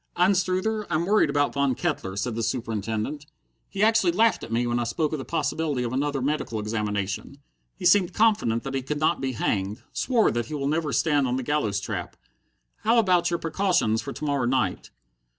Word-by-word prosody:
"Anstruther, 190 +3 +1
I'm 160 +2 0
worried 205 -5 +3
about 145 0 +1
Von 140 -2 +1
Kettler," 140 - -2
said 115 +4 -1
the 115 - -3
Superintendent. 115 +4 -3 0.4
"He 195 +1 -1
actually 220 -5 +4
laughed 225 +5 +3
at 115 - -8
me 120 +2 +1
when 120 0 0
I - - 0
spoke 145 +7 -1
of 155 - -2
the 135 - -6
possibility 160 -5 -1
of 120 0 -3
another 140 0 -1
medical 140 -6 -1
examination. 105 +2 -3 0.4
He - - -8
seemed 195 -4 +5
confident 210 - +2
that 135 - -5
he 135 - -1
could 145 +3 -3
not 155 +2 +1
be 130 -1 -2
hanged. 100 -2 -2
Swore 240 -4 +2
that 120 -1 -2
he 155 - -5
will 140 -1 -2
never 155 +1 0
stand 145 -4 +2
on 125 - 0
the 130 - -2
gallows 120 -8 0
trap. 100 - -5 0.6
How 230 +2 +2
about 180 -6 +3
your 170 - 0
precautions 165 - +1
for 140 - -6
to 150 - -6
morrow 140 -4 0
night?" 120 -7 0
140 Hz, 200 wpm, -25 LUFS, 115-175 Hz, 0.6 s, seemed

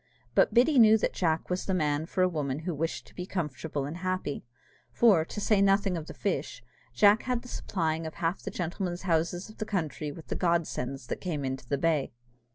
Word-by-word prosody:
But - - +4
Biddy 255 +3 +5
knew 220 -1 +8
that 215 - -1
Jack 165 -1 0
was 180 - -2
the 190 - +1
man 150 -2 0
for 185 +1 +1
a - - +5
woman 150 -4 -2
who 180 - -1
wished 160 +2 -3
to - - -18
be 180 0 -6
comfortable 150 -5 -3
and 150 +4 -5
happy; 185 -5 -2 0.5
for, 205 -9 +5
to 210 - -6
say 210 -1 +3
nothing 195 -1 +3
of 160 -2 -5
the - - -7
fish, - - -3 0.3
Jack 210 +2 +5
had 250 -2 -2
the - - -11
supplying 165 -8 -2
of 160 - -8
half 165 +2 -1
the - - -5
gentlemen's 175 +1 -3
houses 175 0 0
of 215 - -15
the - - 0
country 160 -6 -2
with 160 +2 -11
the - - -1
Godsends 145 -7 -1
that - - -5
came 155 -7 -2
into 130 -2 -4
the 140 - +1
bay. 155 -2 +1
170 Hz, 215 wpm, -29 LUFS, 155-195 Hz, 0.5 s, knew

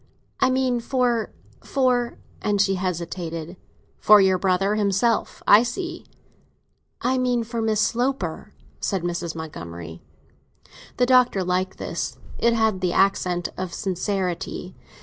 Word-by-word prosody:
"I 260 - +4
mean 255 -1 +1
for—for—" 240 - -1 0.2
and 205 -1 0
she 195 0 +3
hesitated. 170 -2 -4 0.4
"For 210 0 +7
your 190 -1 +3
brother 195 +2 +2
himself. 210 +2 0
I 205 - +8
see!" 295 +9 -4 0.9
"I 260 +1 +1
mean 245 -2 +1
for 230 0 -4
Miss 220 -1 +1
Sloper," 255 +5 -1 0.3
said 195 -4 -1
Mrs. 175 -1 -3
Montgomery. 85 - -8 1.0
The 250 - +4
Doctor 250 -6 +4
liked 185 +1 -1
this; - - -4 0.2
it 235 0 +3
had 220 -4 +1
the 180 -2 0
accent 180 -2 +1
of 185 -2 -4
sincerity. 190 -2 -3
195 Hz, 120 wpm, -23 LUFS, 180-240 Hz, 1.0 s, I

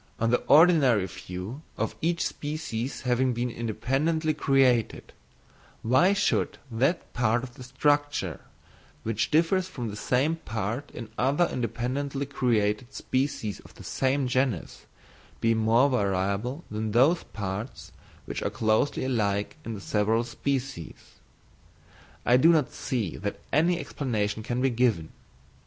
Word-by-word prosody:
On 115 0 +1
the 125 - +3
ordinary 145 - +6
view 90 - -7 0.2
of - - -2
each 170 +1 +1
species 145 -5 -4
having 125 0 +1
been 120 +1 -2
independently 135 +9 0
created, 135 -5 +2 0.7
why 130 - +4
should 200 -1 +1
that 135 +10 0
part 120 0 +1
of 125 -2 -8
the 130 - -14
structure, 145 - 0 0.6
which 110 -1 -1
differs 170 +4 +2
from 125 -11 -5
the - - -7
same 135 +9 +1
part 115 +1 -4
in 115 -2 -9
other 145 +7 +3
independently 130 +4 -2
created 120 -3 0
species 130 -7 -2
of - - -17
the - - -12
same 135 +1 0
genus, 125 -7 -1 0.5
be 115 0 +3
more 115 +4 +4
variable 100 - -1
than 110 0 -3
those 140 +9 +4
parts 105 +3 -6 0.3
which - - -4
are - - 0
closely 110 +5 +1
alike 105 -5 0
in 115 - -5
the - - -7
several 110 +3 +1
species? 130 - -4 1.1
I 125 - +5
do 155 +6 +6
not 155 -5 +2
see 120 - -3
that 100 +1 -4
any 170 +4 +3
explanation 110 -9 -2
can 120 +3 -2
be 135 - +3
given. 115 -10 +1
125 Hz, 135 wpm, -27 LUFS, 110-140 Hz, 1.1 s, ordinary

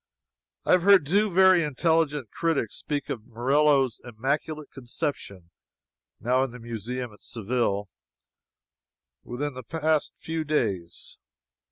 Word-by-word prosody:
I - - +2
have 180 - +6
heard 195 -3 +6
two 200 +7 +2
very 185 -1 +6
intelligent 150 - +1
critics 165 -8 -1
speak 145 -2 -3
of 115 -2 -6
Murillo's 135 +2 +2
Immaculate 140 +6 -3
Conception 120 - -5 0.7
(now 125 +3 +2
in 135 - -2
the 120 - -10
museum 120 +1 -5
at 105 - -19
Seville,) 110 -3 -1 1.4
within 140 +4 -4
the 130 - -7
past 155 +3 0
few 160 0 -3
days. 100 - -2
135 Hz, 120 wpm, -26 LUFS, 120-155 Hz, 1.4 s, have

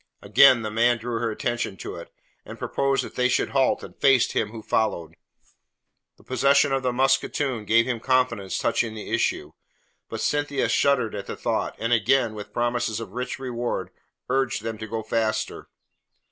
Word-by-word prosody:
Again 120 +3 +6
the 110 - -3
man 120 +2 +3
drew 115 +1 -4
her 115 0 -1
attention 115 -2 -3
to - - -7
it, - - -10 0.3
and - - -10
proposed 135 0 0
that - - -9
they 125 0 +2
should 125 - +1
halt 135 -1 +1
and - - -10
face 135 -3 +3
him 105 - -1
who 110 0 -9
followed. 85 -9 -1 1.0
The - - -21
possession 140 +3 +3
of 135 0 +1
the 130 -1 0
musketoon 135 -2 0
gave 115 +2 +4
him 120 -3 -2
confidence 125 -6 0
touching 115 -2 0
the 110 - -7
issue. - - 0 0.6
But - - -5
Cynthia 145 -2 0
shuddered 130 -6 +2
at 100 -1 -6
the - - -6
thought, - - -2
and 115 +2 0
again, 120 +1 +2
with 105 -1 -8
promises 120 -2 -1
of 115 - -7
rich 125 0 -4
reward, 120 -7 -3 0.4
urged 135 -2 0
them 115 -1 -4
to 110 - -6
go 110 +1 -4
faster. 110 -1 -2
120 Hz, 175 wpm, -24 LUFS, 110-130 Hz, 1.0 s, Again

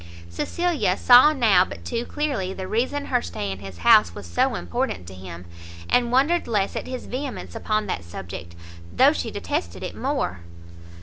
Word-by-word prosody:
Cecilia 245 - 0
saw 250 +5 +7
now 235 -9 +4
but 85 -1 -9
too 230 - -3
clearly 260 -11 -2
the 190 -1 -6
reason 260 +7 -1
her - - +1
stay 85 +4 -4
in 95 - -6
his 95 -3 -9
house 85 0 +6
was 100 - -8
so 85 0 +1
important 85 +1 -3
to 95 - -10
him; 90 -2 -9 0.4
and 240 -1 +2
wondered 285 +7 +2
less 205 -4 0
at - - -4
his 255 -1 -6
vehemence 265 +1 -5
upon 215 -2 -1
that 90 - -3
subject, 85 0 -8 0.4
though 90 - +5
she - - -3
detested 85 0 -4
it - - -5
more. 90 0 -2
190 Hz, 175 wpm, -24 LUFS, -, 0.4 s, saw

